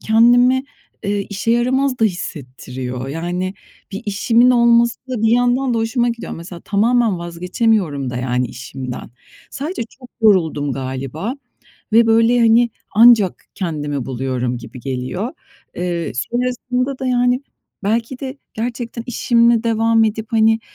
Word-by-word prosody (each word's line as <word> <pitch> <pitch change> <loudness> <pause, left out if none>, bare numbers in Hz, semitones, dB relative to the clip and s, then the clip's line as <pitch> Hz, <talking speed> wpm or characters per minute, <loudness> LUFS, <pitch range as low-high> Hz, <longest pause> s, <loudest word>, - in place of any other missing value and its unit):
kendimi, 245 +4 +4 0.4
eee, 205 0 0
işe 205 +3 -2
yaramaz 255 +2 +1
da 225 - +3
hissettiriyor. 130 - -5
Yani, 175 +5 -3 0.4
bir 195 +4 -5
işimin 230 +5 +3
olması 235 -1 +4
da 245 -4 -2
bir 225 - +4
yandan 245 +1 +1
da - - +1
hoşuma 235 +2 +1
gidiyor. 235 -1 -5
Mesela, 170 +1 -8
tamamen 220 -1 +2
vazgeçemiyorum 170 - -1
da 125 - -5
yani 125 0 0
işimden. 125 0 -7 0.4
Sadece 290 +1 -4 0.2
çok 250 -2 -13
yoruldum 160 -9 +3
galiba 135 - -4 0.6
ve, 230 +1 +6
böyle, 230 +2 +4
hani, 230 +1 +4 0.2
ancak 220 -4 +5
kendimi 145 -7 -3
buluyorum 125 -1 -2
gibi 120 +2 -11
geliyor. 135 - -4 0.4
Eee, 175 -3 -2
sonrasında 250 - -2
da, 260 - -2
yani, 245 +1 +2 0.4
belki 230 +4 -1
de 270 0 -6 0.2
gerçekten 235 0 -4
işimle 235 -1 +3
devam 225 0 +3
edip, 220 0 -2
hani, 225 0 +3
220 Hz, 130 wpm, -19 LUFS, 160-240 Hz, 0.6 s, ve